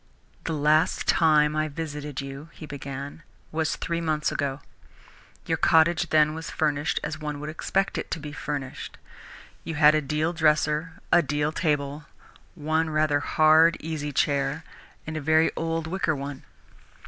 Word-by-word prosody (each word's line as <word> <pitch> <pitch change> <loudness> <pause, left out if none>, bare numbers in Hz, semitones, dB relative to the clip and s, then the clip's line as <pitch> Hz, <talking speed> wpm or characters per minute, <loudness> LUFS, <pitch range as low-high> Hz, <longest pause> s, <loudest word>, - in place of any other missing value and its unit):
"The 165 - -1
last 155 +1 +2
time 150 -2 +4
I 155 0 0
visited 150 -2 -5
you," 135 +3 -8
he 155 - -10
began, 140 +1 -7 0.3
"was 160 0 -1
three 170 -1 -3
months 155 -2 0
ago. 140 -1 -2 0.8
Your - - -1
cottage 165 +1 +3
then 155 -1 +4
was 160 +1 -6
furnished 150 -1 0
as 155 0 -4
one 150 -1 -4
would 150 +1 -5
expect 195 +4 -1
it - - -6
to - - -3
be 150 0 -7
furnished. 145 -3 -5 0.7
You 165 - -5
had 150 0 +6
a 155 - +2
deal 155 +3 -1
dresser, 155 0 +1 0.2
a 175 - +6
deal 145 0 -1
table, 150 -2 -1 0.5
one 160 0 0
rather 155 -1 +2
hard 155 +3 +4
easy 155 -2 -4
chair 140 +2 0 0.4
and 155 - -5
a 155 - -3
very 155 +2 +3
old 165 0 -2
wicker 165 -2 -1
one. 140 0 -7
155 Hz, 155 wpm, -26 LUFS, 145-160 Hz, 0.8 s, had